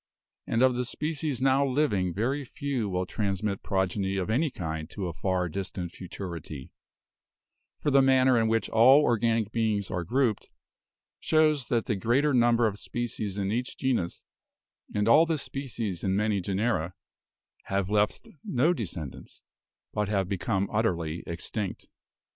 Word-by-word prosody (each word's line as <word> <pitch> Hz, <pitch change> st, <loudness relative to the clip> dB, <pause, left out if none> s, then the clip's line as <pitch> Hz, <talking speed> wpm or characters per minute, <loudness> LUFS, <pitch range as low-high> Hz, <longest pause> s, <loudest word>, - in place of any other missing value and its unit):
And 115 Hz, +3 st, +2 dB
of 130 Hz, -1 st, +4 dB
the 125 Hz, -, 0 dB
species 145 Hz, 0 st, -3 dB
now 135 Hz, +1 st, +4 dB
living 125 Hz, -10 st, +1 dB
very 130 Hz, +10 st, -1 dB
few 130 Hz, -4 st, -3 dB
will 90 Hz, 0 st, -1 dB
transmit 100 Hz, 0 st, -2 dB
progeny 95 Hz, 0 st, -1 dB
of 95 Hz, +2 st, -1 dB
any 150 Hz, +7 st, +2 dB
kind 80 Hz, -, -5 dB
to 100 Hz, 0 st, -5 dB
a 85 Hz, -, -3 dB
far 90 Hz, +2 st, -1 dB
distant 90 Hz, 0 st, -5 dB
futurity; 85 Hz, -7 st, -7 dB, 1.1 s
for 145 Hz, -, 0 dB
the 135 Hz, 0 st, +6 dB
manner 130 Hz, -1 st, +4 dB
in 115 Hz, -1 st, +3 dB
which 115 Hz, 0 st, +1 dB
all 130 Hz, +6 st, +6 dB
organic 115 Hz, -3 st, +1 dB
beings 110 Hz, -4 st, 0 dB
are 90 Hz, -, -2 dB
grouped, 120 Hz, +3 st, 0 dB, 0.7 s
shows 155 Hz, -4 st, +2 dB
that 115 Hz, -2 st, 0 dB
the 110 Hz, -, 0 dB
greater 125 Hz, +9 st, +2 dB
number 120 Hz, -1 st, +4 dB
of 105 Hz, -2 st, -1 dB
species 110 Hz, -4 st, -4 dB
in 100 Hz, 0 st, -1 dB
each 125 Hz, +3 st, -2 dB
genus, 125 Hz, -10 st, -1 dB, 0.7 s
and 105 Hz, +1 st, 0 dB
all 155 Hz, +8 st, +6 dB
the 160 Hz, -1 st, +1 dB
species 120 Hz, -, -4 dB
in 95 Hz, -1 st, +1 dB
many 105 Hz, -1 st, +1 dB
genera, 95 Hz, -2 st, -1 dB, 0.7 s
have 95 Hz, -1 st, -1 dB
left 105 Hz, +1 st, 0 dB, 0.2 s
no 145 Hz, +8 st, +2 dB
descend 85 Hz, -, -5 dB
ants, -, -, -14 dB, 0.5 s
but 105 Hz, -1 st, -1 dB
have 100 Hz, -3 st, +1 dB
become 100 Hz, +1 st, -1 dB
utterly 85 Hz, -7 st, 0 dB
extinct. 90 Hz, +4 st, -4 dB
110 Hz, 150 wpm, -28 LUFS, 95-130 Hz, 1.1 s, the